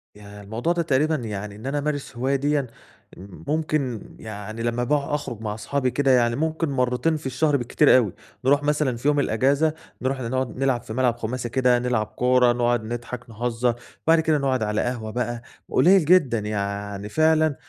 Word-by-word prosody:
ياه! 105 0 -12
الموضوع 115 +11 -1
ده 175 - 0
تقريبًا 155 +1 +2
يعني 105 -5 -5
إن 110 +5 -11
أنا 140 +2 -1
أمارس 145 -3 -3
هواية 130 +3 +1
ديًا، 145 +1 +1 0.6
م 95 0 -12
ممكن 150 -7 -1 0.2
يعني 110 +1 -7
لمّا 120 +1 0
بقى 145 +2 0
أخرج 120 -6 -5
مع 105 -2 -3
اصحابي 130 +4 -1
كده، 135 0 +2
يعني 120 -2 +3
ممكن 160 +2 -1
مرّتين 130 +4 +1
في 150 - -13
الشهر 140 +3 +1
بالكتير 130 +3 +4
أوي، 110 -8 +1 0.3
نروح 140 +2 +4
مثلًا 145 -4 +1
في 125 - -3
يوم 150 0 +3
الإجازة، 140 +6 +2 0.3
نروح 130 +1 -1
ن 115 - -3
نقعُد 130 -2 -2
نلعب 130 -3 +1
في 110 - -8
ملعب 125 -1 +1
خُماسي 120 +1 -4
كده، 125 0 +3
نلعب 120 -3 0
كورة، 125 +1 +3
نقعُد 120 -1 +1
نضحك، 120 +1 -6
نهزّر. 120 +1 -1 0.3
بعد 165 0 +6
كده 160 -1 +2
نقعُد 130 -4 0
على 105 0 0
قهوة 120 -3 -3
بقى، 120 0 -3 0.3
قليّل 185 -1 +5
جدًا 150 -9 +4
يعني 100 -1 -4
فعلًا 155 +1 +3
125 Hz, 185 wpm, -24 LUFS, 115-145 Hz, 0.6 s, بعد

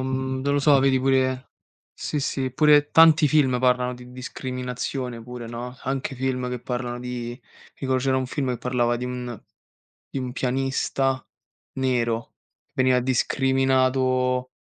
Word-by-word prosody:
mhmm, 130 0 -2
non 140 +1 +1
lo 145 - +2
so 140 -1 +5
vedi 135 -1 +3
pure 130 -1 +1 0.4
sì 150 - -3
sì, 130 -2 -2
pure 150 0 +4
tanti 160 -2 +7
film, 135 -4 +3
parlano 125 0 +2
di 125 0 -12
discriminazione 125 -1 -5
pure, 120 0 -8
no, 120 +2 -6
anche 135 +1 -2
film 125 -1 -2
che 125 -1 -4
parlano 125 -1 -4
di 125 0 -5 0.3
tipo 130 -1 -1
c'era 130 +1 +1
un 130 -1 -1
film, 135 0 -2
che 125 - -2
parlava 120 -1 0
di 125 - -5
un 125 -2 -5 0.7
di 135 - -4
un 125 -1 -4
pianista 135 0 -1 0.5
nero 120 -3 -1 0.3
che - - -48
veniva 130 -1 +3
discriminato 130 0 +1
130 Hz, 150 wpm, -24 LUFS, 125-135 Hz, 0.7 s, tanti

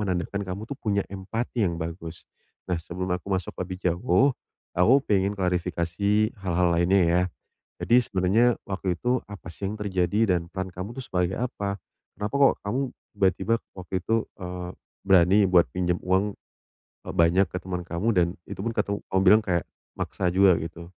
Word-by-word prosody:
menandakan 100 0 -2
kamu 95 +3 -5
tuh 140 - -2
punya 100 -3 0
empati 110 +5 -3
yang 85 -2 -2
bagus. 85 0 -6 0.5
Nah, 90 - +1
sebelum 90 +3 -5
aku 90 - -7
masuk 95 -1 -1 0.2
lebih 90 0 -6
jauh, 120 +10 +3 0.4
aku 90 +9 +5
pengen 100 0 +2
klarifikasi 90 +4 0
hal-hal 90 -1 +2
lainnya 90 +3 +3
ya. 85 +2 +3 0.6
Jadi 120 +1 +5
sebenarnya 110 +4 +2
waktu 95 -2 -2
itu 125 +5 0
apa 100 -4 -9
sih 100 - -6
yang 105 - -5
terjadi 100 +1 +1
dan 85 0 -7
peran 95 0 -4
kamu 95 +7 -7
itu 130 - -5
sebagai 90 0 -1
apa? 100 -5 -3 0.4
Kenapa 105 +5 -4
kok, 140 -1 +6
kamu 115 +6 -1 0.3
tiba-tiba 100 +2 +1 0.2
waktu 90 0 -10
itu, 115 +4 0 0.2
eee, 90 0 -5 0.4
berani 95 +2 +5
buat 90 -2 +6
pinjam 90 -1 0
uang 95 +2 +1 0.7
e - - -8
banyak 85 +3 +4
ke 90 - -3
teman 90 -1 -4
kamu 85 +7 -2
dan 90 -2 +4 0.2
itupun 110 +5 -3
katu 100 0 -1
kamu 95 - +2
bilang 105 +4 +7
kayak 90 -5 -1 0.3
maksa 90 -1 -1
juga 95 0 +5
gitu? 85 +1 -7
95 Hz, 165 wpm, -26 LUFS, 90-105 Hz, 0.7 s, bilang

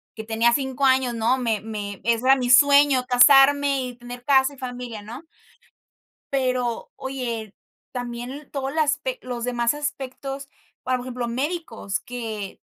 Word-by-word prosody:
que 220 - -6
tenía 225 +1 +2
5 265 0 -1
años, 260 -2 +3
¿no?, 235 +3 +1
me 225 -5 -1
me 205 -2 -6
ese 235 +1 +1
era 270 - +7
mi 250 -1 -2
sueño, 280 0 +6
casarme 275 +2 +5
y 250 -1 -6
tener 245 0 -10
casa, 270 0 +4
y - - -16
familia, 245 -4 -6
¿no? 245 +10 -10 1.1
Pero, 255 -3 -1
oye, 235 -6 -5 0.4
también 245 +3 -6
todo 270 -1 -3
las 300 0 +1
pec - - -5
los 245 -2 -5
demás 240 0 +1
aspectos, 275 -1 -5 0.4
ahora 255 0 0
por 245 - -8
ejemplo, 250 -1 -4
médicos, 250 - -3
que 220 -5 -6
250 Hz, 150 wpm, -23 LUFS, 235-275 Hz, 1.1 s, era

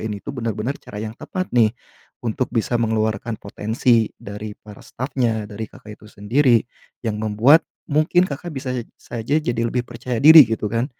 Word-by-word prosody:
ini 110 -2 -3
tuh - - -5
benar-benar 115 +4 -3
cara 105 - -11
yang 110 +1 -4
tepat 185 +8 -5
nih 115 -1 +3 0.5
untuk 120 +3 -1
bisa 120 +1 -1
mengeluarkan 110 0 -1
potensi 110 +2 +1
dari 105 +1 -8
para 105 -1 -14
stafnya, 120 -4 -2
dari 105 +1 -7
Kakak 115 -5 -13
itu 105 - -15
sendiri, 120 +5 +2 0.5
yang 105 -1 -2
membuat 110 +9 +5 0.3
mungkin 155 +4 +3
Kakak 170 -1 -4
bisa 130 -1 -4
e 120 - -4
saja 120 +4 -4
jadi 115 -3 -1
lebih 125 +1 -1
percaya 120 0 -5
diri 155 -4 +10
gitu 110 -2 -2
kan, 115 +3 0
115 Hz, 170 wpm, -21 LUFS, 110-130 Hz, 0.5 s, diri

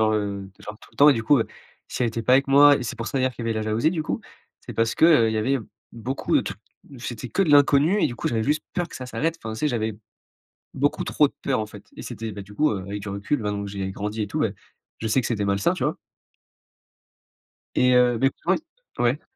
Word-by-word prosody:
genre, 110 0 +3
heu, 100 -2 -2
genre, 105 0 -9
tout - - -16
le - - -24
temps 145 - +7
et 145 - +8
du 115 - -2
coup, 140 +5 +4
heu, 115 - 0 0.4
si - - -3
elle 120 - +2
était 115 +1 -4
pas 125 - +2
avec 135 +1 +4
moi 145 +1 +7
et - - -4
c'est 120 - -5
pour 115 - -5
ça, 135 - -1
d'ailleurs, 130 0 +1
qu'il 120 0 -7
y - - 0
avait - - +1
la 110 - -2
jalousie 110 +8 +1
du 160 - -2
coup, - - -3 0.4
c'est - - -9
parce 115 0 0
qu'il 150 -9 +5
y 110 - -1
avait 130 +6 +1 0.3
beaucoup 120 +4 -3
de - - +4
t - - -4 0.5
c'était 120 0 -6
que 195 - +1
de 165 - +1
l'inconnu 145 +7 +5
et - - +3
du 120 - -7
coup - - -4
j'avais 115 -2 0
juste 150 +5 0
peur 175 -1 -1
que - - -9
ça 130 - -7
s'arrête. 165 +5 -2
Enfin, 110 - -5
tu 110 - -7
sais, 150 - +2
j'avais 110 -4 -2 0.8
beaucoup 145 +2 0
trop 150 - +3
de - - -8
peur, 135 -4 0
en 110 - -2
fait 105 - -13
et - - -7
c'était, 115 0 -6
beh, 100 -1 -7
du 105 +1 -14
coup, 155 +7 +2
heu, 105 - -2
avec 100 +2 -5
du 105 - -6
recul, 100 +7 -2
maintenant 105 -1 -2
que 100 - -6
j'ai 95 -1 -4
grandi 105 +3 -4
et 105 - -2
tout, - - -3
bah, - - +1 0.5
je 110 - -3
sais 130 +5 +3
que - - -3
c'était 105 -4 -1
malsain, 100 0 +1
tu - - -5
vois? - - -1 1.8
Et 125 0 +4
heu, 125 -1 +4
beh, 135 - +3
écoute 190 - -1 0.4
ouais - - +1
ouais. 125 +6 +1
120 Hz, 275 wpm, -24 LUFS, 110-140 Hz, 1.8 s, et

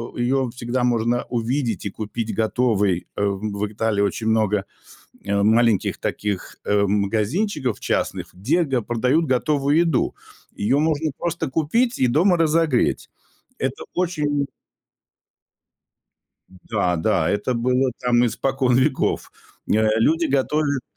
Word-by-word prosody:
э, - - -7
её 130 +1 +1
всегда 125 +1 -2
можно 120 0 +1
увидеть 120 0 -1
и - - -1
купить 110 +1 -4
готовой. 110 -5 +1
Э, 100 - -1
в 100 +1 -2
Италии 110 -1 0
очень 100 +2 -1
много, 105 -3 +1 0.6
э, 100 0 0
маленьких 110 -1 +3
таких, 100 -3 -3
э, 105 0 +2
магазинчиков 110 - 0
частных, - - -2
где 140 - +1
г 135 -5 -1
продают 125 +8 +1
готовую 140 +2 +1
еду. 165 -7 +1 0.4
Её 130 +8 +1
можно 155 0 0
просто 170 -3 -2
купить 230 - +1
и 130 - +3
дома 175 +8 +3
разогреть. 160 -5 +1 0.5
Это - - -3
очень 150 -6 0 2.0
Да, 95 -1 -2
да, 80 - +1
это 105 +5 0
было 125 +2 +1
там 125 -1 +3
испокон 130 +2 0
веков. 130 - 0 0.4
Э, 110 +1 +2
люди 160 +9 +2
готовят 140 0 0
125 Hz, 125 wpm, -22 LUFS, 110-145 Hz, 2.0 s, маленьких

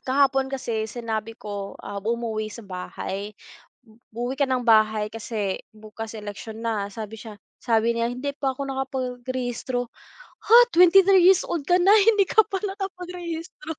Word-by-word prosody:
kahapon 270 0 +2
kasi 230 -5 -3
sinabi 225 -1 -4
ko, 200 -1 -7
ah, 200 0 -6
umuwi 220 0 -2
sa 220 +1 -10
bahay, 195 +2 -6 0.8
"uuwi 245 +3 -3
ka 280 - +4
ng 255 -1 0
bahay 215 -2 +4
kasi 215 -3 -3 0.2
bukas 220 +1 -8
eleksyon 215 +2 -8
na" 210 -3 -1
sabi 220 +1 -7
siya 215 -3 -10 0.2
sabi 230 -1 +2
niya 230 0 0
"hindi 275 +3 -4
pa 270 -2 -1
ako 280 - -4
nakapagrehistro," 255 -2 -3 0.6
"Ha! 450 - +4 0.2
23 370 +1 +6
years 375 0 +6
old 330 -5 -2
ka 355 - +4
na 385 +3 +5
hindi 420 -2 +4
ka 440 - +6
pa 390 -3 -3
nakapagrehistro". 360 -2 -6
240 Hz, 150 wpm, -24 LUFS, 220-290 Hz, 0.8 s, 23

